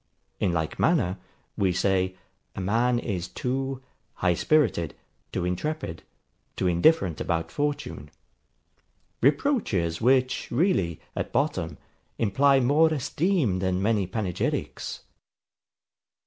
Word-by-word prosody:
In - - +1
like 80 -2 -2
manner, 105 - +2 0.4
we 95 -2 +2
say, 95 +1 +1 0.4
a - - -5
man 115 +6 +2
is 95 -7 -3
too 135 +1 -3 0.3
HIGH 90 -1 +2
SPIRITED, 85 - +1 0.4
TOO 90 - -2
INTREPID, 90 - -3 0.5
TOO - - -2
INDIFFERENT 90 - +3
ABOUT 80 -1 -1
FORTUNE: 145 - -3 1.1
reproaches, 130 - +1
which 130 +1 +2
really, 120 - +1
at - - -3
bottom, - - -1 0.4
imply 135 +6 +4
more 150 +6 +4
esteem 150 - +1
than 95 -1 0
many 100 -1 +1
panegyrics. 95 -5 -3
110 Hz, 105 wpm, -26 LUFS, 90-140 Hz, 1.1 s, imply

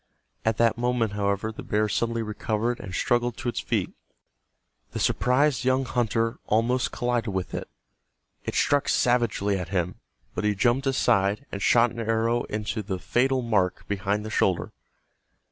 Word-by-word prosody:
At 110 -1 +1
that 115 0 +2
moment, 120 -3 +1
however, 100 +1 -1
the 110 - -9
bear 105 +1 0
suddenly 115 +2 -1
recovered 110 +2 -2
and 95 - -7
struggled 120 +5 0
to 120 - -2
its - - -3
feet. - - -1 1.0
The - - -3
surprised 130 +2 +2
young 130 +1 +2
hunter 115 -2 0
almost 120 +4 +1
collided 120 -3 -1
with 95 -1 -3
it. - - -4 0.7
It - - -4
struck 145 -1 +2
savagely 110 -5 +2
at 90 -1 -5
him, 90 -2 -2 0.3
but - - -3
he 105 -1 +2
jumped 120 +6 +2
aside, 105 -2 +2
and 100 - -5
shot 120 +3 +4
an 115 - -8
arrow 115 +1 +1
into 105 +1 -3
the 95 -2 -3
fatal 130 +6 +1
mark 100 -6 0
behind 100 +1 -1
the 110 - -5
shoulder. 95 -4 +1
115 Hz, 160 wpm, -26 LUFS, 105-120 Hz, 1.0 s, shot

